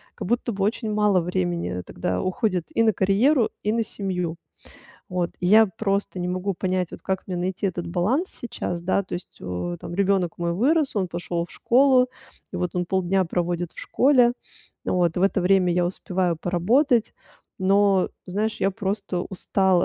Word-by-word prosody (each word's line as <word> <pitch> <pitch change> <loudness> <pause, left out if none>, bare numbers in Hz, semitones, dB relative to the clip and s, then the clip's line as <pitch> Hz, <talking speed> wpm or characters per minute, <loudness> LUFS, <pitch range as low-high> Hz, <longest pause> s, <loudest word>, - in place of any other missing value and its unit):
как 205 - -6
будто 240 +2 0
бы 195 -2 -2
очень 220 +1 -1
мало 210 -3 +3
времени 90 - -2
тогда 90 +1 -2
уходит 185 -2 -1
и 230 - +3
на 220 -1 +4
карьеру, 225 +8 +3
и 210 - +1
на 230 +1 +1
семью. 180 -6 -3 0.7
Вот, 180 -2 -1
и 180 - -1
я 220 +4 +7
просто 200 -2 -2
не 175 - -2
могу 185 +2 -2
понять, 185 -1 -1
вот - - -10
как 190 -1 -2
мне 185 - -3
найти 185 +3 -2
этот 175 -2 -3
баланс 205 - 0
сейчас, 175 -7 -5
да, 190 +2 +1
то 185 - -7
есть 175 - -9
у 90 -1 -4
там - - -7
ребенок 190 -2 +1
мой 170 0 -1
вырос, 275 - +2
он 190 -2 +1
пошел 170 0 -3
в - - -23
школу 255 0 +4 0.4
вот, 180 -2 -2
он 180 0 0
полдня 190 +1 +1
проводит 175 0 -2
в - - -18
школе. 250 -3 +4 0.5
Вот 175 -2 +1
в 180 - +1
это 195 0 +2
время 180 -1 +3
я 175 0 +2
успеваю 180 -1 -1
поработать, 225 - +2 0.4
но, 195 0 +3 0.2
знаешь, 210 +4 -2
я 195 - +2
просто 195 -2 -3
устала 190 -1 +1
190 Hz, 175 wpm, -24 LUFS, 175-210 Hz, 0.7 s, я